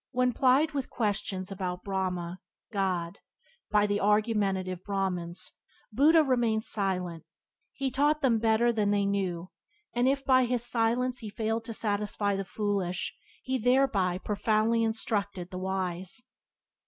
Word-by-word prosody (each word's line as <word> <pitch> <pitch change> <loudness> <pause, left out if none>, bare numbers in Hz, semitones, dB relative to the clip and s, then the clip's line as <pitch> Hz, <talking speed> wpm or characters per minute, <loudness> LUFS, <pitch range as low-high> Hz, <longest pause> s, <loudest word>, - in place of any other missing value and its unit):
When, 250 -1 +1
plied 270 +6 +3
with 275 -3 -3
questions 205 -4 -2
about 180 -2 -4
Brahma 185 -2 -2 0.3
(God) 185 -4 -1 0.5
by 210 -1 +4
the 205 0 0
argumentative 200 -3 +1
Brahmans, 185 -4 -3 0.4
Buddha 305 +8 +5
remained 235 -5 +1
silent, 180 -6 -1 0.5
he 270 -1 -3
taught 295 +3 +2
them 235 -4 +3
better 230 +1 +3
than 210 -2 +1
they 205 -1 +2
knew, 185 -3 -2 0.4
and 245 +1 +2
if 275 0 +1
by 255 -1 +5
his 245 -1 0
silence 245 +2 +1
he 220 -3 -6
failed 225 +2 -2
to 230 - -5
satisfy 205 -1 0
the 195 - -2
foolish 195 -3 -2 0.3
he 260 0 -1
thereby 235 -7 +2
profoundly 215 +3 +1
in 225 -1 +1
structured 200 -5 -3
the 185 - -5
wise. 190 +2 -2
210 Hz, 140 wpm, -29 LUFS, 190-240 Hz, 0.5 s, Buddha